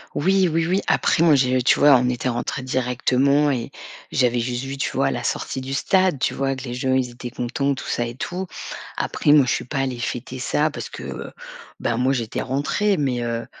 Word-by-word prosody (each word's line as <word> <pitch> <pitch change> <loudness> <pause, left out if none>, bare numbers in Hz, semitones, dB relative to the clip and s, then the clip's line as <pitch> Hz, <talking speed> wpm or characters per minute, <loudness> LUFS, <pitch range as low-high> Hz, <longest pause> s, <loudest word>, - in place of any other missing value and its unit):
Oui, 190 +4 +3
oui, 165 +1 +1
oui, 185 +4 +1
après, 165 - +2
moi, 165 -3 +6
j'ai 130 -1 +2
tu 125 - +4
vois, 145 -1 +7
on 125 0 +1
était 125 +1 -1
rentrés 120 +2 -3
directement 130 +3 +2
et 120 -4 -2 0.4
j'avais 125 -2 +2
juste 120 +1 -2
vu, 135 0 -5
tu 140 - -1
vois, - - +1
la - - -4
sortie 130 - -2
du 135 +1 -4
stade, 185 0 +2
tu - - 0
vois? 135 0 -1
Que 130 - -8
les 120 -2 -5
gens, 130 +1 0
ils 130 -2 0
étaient 120 0 -7
contents, 140 +4 -1
tout - - -8
ça 120 - -1
et 120 - -7
tout. 180 +7 -4 0.5
Après 145 - +1
moi, 145 -3 +7
je 125 - 0
suis - - -1
pas 140 +4 -4
allée 130 -2 -2
fêter 125 +1 -4
ça 150 +4 +1
parce - - -6
que, - - -9
heu, - - -6 0.5
bah, 115 - 0
moi, 130 +2 +2
j'étais 115 -4 -2
rentrée 165 +10 0
mais 130 -5 0
heu 115 0 -3
130 Hz, 225 wpm, -22 LUFS, 125-145 Hz, 0.5 s, vois